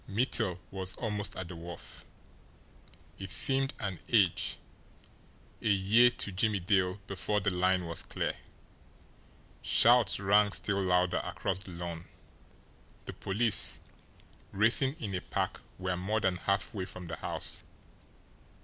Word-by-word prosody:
Mittel 105 -3 +2
was 95 -1 -5
almost 105 -3 -3
at 95 - -6
the 90 - -9
wharf. 85 0 -10 1.1
It 95 -1 -6
seemed 135 +8 +4
an 95 -5 -4
age, 95 -7 +2 1.0
a - - -2
year 105 +5 +5
to 120 -4 -4
Jimmie 100 +2 0
Dale 95 +1 +1
before 100 +2 -1
the 100 -1 0
line 90 0 +1
was 85 0 -3
clear. - - -3 1.3
Shouts 120 -2 +4
rang 100 +1 +3
still 100 -1 0
louder 90 -1 +1
across - - -3
the 95 - -11
lawn 85 -1 -6 1.0
the - - -7
police, 110 +3 +2 0.7
racing 115 +7 +4
in 105 -4 -5
a 90 - -2
pack, - - -3 0.2
were 90 -1 -2
more 100 +5 -1
than 95 -4 0
halfway 100 +1 -1
from 90 -1 -8
the 85 -2 -6
house. - - -3
95 Hz, 130 wpm, -30 LUFS, 90-105 Hz, 1.3 s, year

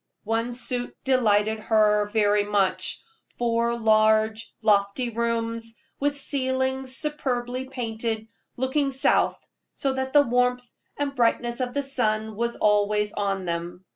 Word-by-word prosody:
One 230 +3 -1
suit 245 0 -3
delighted 220 -4 +2
her 210 -1 +3
very 205 -1 +2
much 205 -2 0 0.3
four 235 0 0
large, 220 0 +2
lofty 210 +3 +2
rooms, 230 0 -2 0.2
with 285 0 0
ceilings 260 -1 -1
superbly 255 -4 -2
painted, 225 -3 -4 0.3
looking 265 +3 0
south, 265 0 +2 0.4
so 275 -2 0
that 265 0 -3
the 290 0 +6
warmth 250 0 +1 0.3
and 285 -1 -2
brightness 240 0 +1
of 250 0 -3
the 285 - 0
sun 220 -5 -1
was 235 +2 -1
always 210 0 +2
on 195 -2 -2
them. 170 +2 -4
230 Hz, 125 wpm, -25 LUFS, 215-260 Hz, 0.4 s, the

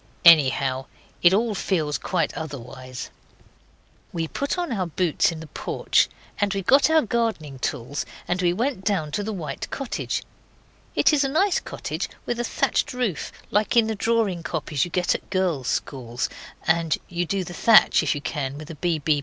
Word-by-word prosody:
Anyhow 135 -4 +5 0.3
it 175 - +7
all 220 +3 +2
feels 160 -7 -1
quite 180 -3 -1
otherwise. 130 -4 -7 1.0
We 165 -1 -2
put 280 - -2
on 350 -4 -2
our 190 -6 -1
boots 170 0 +1
in 160 -1 -7
the - - -8
porch, - - +1 0.3
and 205 -1 +2
we 195 - -2
got 275 - +5
our 320 0 +5
gardening 220 - -1
tools 125 +3 -2 0.2
and 180 +1 0
we 175 -1 +3
went 225 +2 -1
down 180 -8 0
to 205 +7 -1
the 220 - -3
white 175 -7 -5
cottage. 275 -3 -3 0.7
It - - +4
is 290 -1 +4
a 275 - 0
nice 365 +7 +2
cottage, - - -4 0.2
with 240 0 -2
a - - +1
thatched 290 +3 0
roof, 245 - -2 0.2
like 210 +4 +2
in 230 - +6
the 220 - -1
drawing 215 -4 +1
copies 155 -3 -1
you - - -7
get 180 +1 +1
at - - -6
girls' 180 -9 0
schools, 120 -3 -2 0.4
and 165 -1 +2
you 175 0 -2
do 195 +1 0
the 175 - -8
thatch 225 +4 +6
if - - 0
you 145 - -4
can 140 -2 -3
with 155 +2 -8
a - - -8
B.B. 155 -4 +1
175 Hz, 180 wpm, -24 LUFS, 150-220 Hz, 1.0 s, it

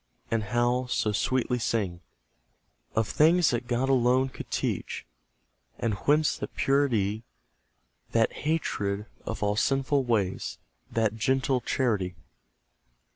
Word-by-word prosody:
And 115 -2 0
how 120 +3 +1
so 110 -3 0
sweetly 125 +3 0
sing, 100 -7 -1 0.9
Of 110 -1 +2
things 165 +3 +4
that 120 0 -2
God 125 +2 0
alone 130 0 +3
could - - -9
teach? - - -2 0.7
And 115 -2 0
whence 150 +8 +2
that - - -6
purity, 115 -7 +1 0.9
That 115 -1 +2
hatred 105 -10 -1 0.2
of 115 - -3
all 105 0 +1
sinful 135 +3 +1
ways 105 -6 -1 0.3
That 110 -1 0
gentle 130 +1 +1
charity? 105 -9 0
120 Hz, 115 wpm, -28 LUFS, 105-130 Hz, 0.9 s, things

